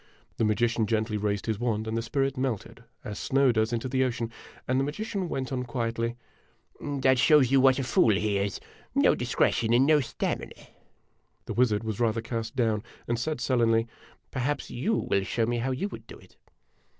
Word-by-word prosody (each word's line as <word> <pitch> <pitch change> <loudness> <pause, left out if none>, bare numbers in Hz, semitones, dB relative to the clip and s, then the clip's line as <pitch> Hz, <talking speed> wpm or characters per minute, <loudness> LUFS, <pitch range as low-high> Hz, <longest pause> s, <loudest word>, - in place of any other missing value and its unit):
The 115 - +2
magician 115 +1 +1
gently 110 0 0
raised 105 -2 -1
his 110 -2 -2
wand, 110 -3 -1
and 110 - -2
the 115 - 0
spirit 135 +3 -1
melted 125 -3 -3 0.2
as 105 -1 -6
snow 135 -1 +3
does 110 0 +1
into 120 +2 -2
the 130 +1 +1
ocean, 120 -2 -2 0.4
and 130 +1 +2
the - - +2
magician 195 +5 -3
went 130 -3 -3
on 130 -1 -1
quietly: 115 -1 -2 0.6
"That 135 -3 +1
shows 145 -3 +5
you 135 -1 +5
what 130 -1 +5
a 135 - -1
fool 115 -4 +3
he 100 0 0
is 100 0 -2 0.4
no - - +5
discretion 115 0 +1
and 125 +3 +5
no 155 0 +5
stamina." 130 -5 -3 0.9
The - - -4
wizard 115 -3 +2
was 110 -2 -4
rather 115 -1 +1
cast 115 +1 -4
down, 110 -4 +1 0.3
and 120 0 -1
said 155 +3 -2
sullenly: 115 -2 +2 0.3
" - - -33
Perhaps 140 +3 -2
you 180 - 0
will 100 - 0
show 115 +3 0
me 120 +1 -1
how 125 +3 -1
you 130 +10 -1
would - - -10
clo - - -10
it - - -20
120 Hz, 195 wpm, -27 LUFS, 110-130 Hz, 0.9 s, shows